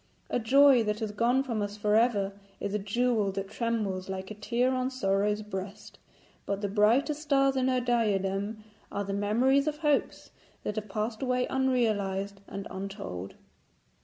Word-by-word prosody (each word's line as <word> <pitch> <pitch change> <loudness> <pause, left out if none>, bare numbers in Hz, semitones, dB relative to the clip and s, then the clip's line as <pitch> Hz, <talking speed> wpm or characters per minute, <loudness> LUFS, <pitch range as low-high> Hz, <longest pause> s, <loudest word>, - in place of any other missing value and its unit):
A - - +1
joy 270 +2 +6
that 210 0 -1
has 220 -2 -3
gone 240 +5 +2
from 230 -5 -2
us 205 0 -4
for 210 0 +1
ever 215 -4 +2 0.3
is 200 - -3
a 210 - 0
jewel 215 0 +1
that 195 +1 -4
trembles 210 -5 -2
like 190 +1 -5
a - - -3
tear 235 +5 0
on 255 0 0
Sorrow's 210 -3 0
breast, 195 -1 -7 0.5
but 200 0 -2
the 205 - 0
brightest 235 +9 +2
stars 275 -2 +2
in 260 -1 +1
her 255 -1 +2
diadem 210 -3 0 0.3
are 200 - -2
the 195 0 -4
memories 245 +8 +2
of 300 -1 -1
hopes 295 -2 0 0.3
that 210 - -3
have 215 -1 -4
passed 215 +2 -3
away 250 -1 +1
unrealised 205 -7 0
and 200 0 -6
untold. 190 - -6
215 Hz, 165 wpm, -29 LUFS, 200-250 Hz, 0.5 s, joy